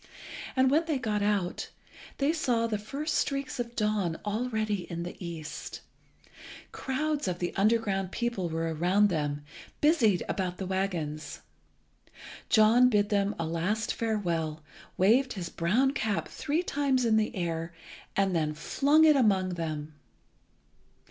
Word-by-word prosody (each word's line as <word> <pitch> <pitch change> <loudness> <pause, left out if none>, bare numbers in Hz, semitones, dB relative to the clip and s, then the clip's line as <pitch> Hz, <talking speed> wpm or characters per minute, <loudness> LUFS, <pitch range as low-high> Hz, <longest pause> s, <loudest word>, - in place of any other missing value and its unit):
And 260 0 +4
when 315 +3 +3
they 310 -4 0
got 215 -5 -1
out, 205 -3 -1 0.5
they 285 +3 +2
saw 245 -8 +1
the 215 -3 -1
first 280 +9 -4
streaks 275 -1 -1
of 240 0 -4
dawn 210 -6 0
already 215 -3 -2
in 170 0 -4
the 175 - -6
east. 160 -3 -7 0.9
Crowds 295 0 -2
of 180 -1 -1
the 175 0 -3
underground 195 -3 +1
people 235 -7 -2
were 165 0 -2
around 185 +6 +3
them, 145 -4 -2 0.4
busied 255 - +3
about 180 -2 -2
the 190 - -4
waggons. 170 -6 -3 1.1
John 230 +4 +6
bid 205 -3 +2
them 200 0 +1
a 165 - -2
last 185 +7 -1
farewell, 170 -9 -2 0.3
waved 245 +8 +4
his 180 -4 -5
brown 215 +13 +2
cap 220 -7 -1
three 315 +4 -2
times 275 -6 +1
in 225 -1 +3
the 220 0 0
air, 165 -2 -2 0.4
and 195 -2 +2
then 155 -2 0
flung 290 - +3
it 305 -1 +6
among 200 -8 +3
them. 155 -3 -4
205 Hz, 140 wpm, -29 LUFS, 175-245 Hz, 1.1 s, John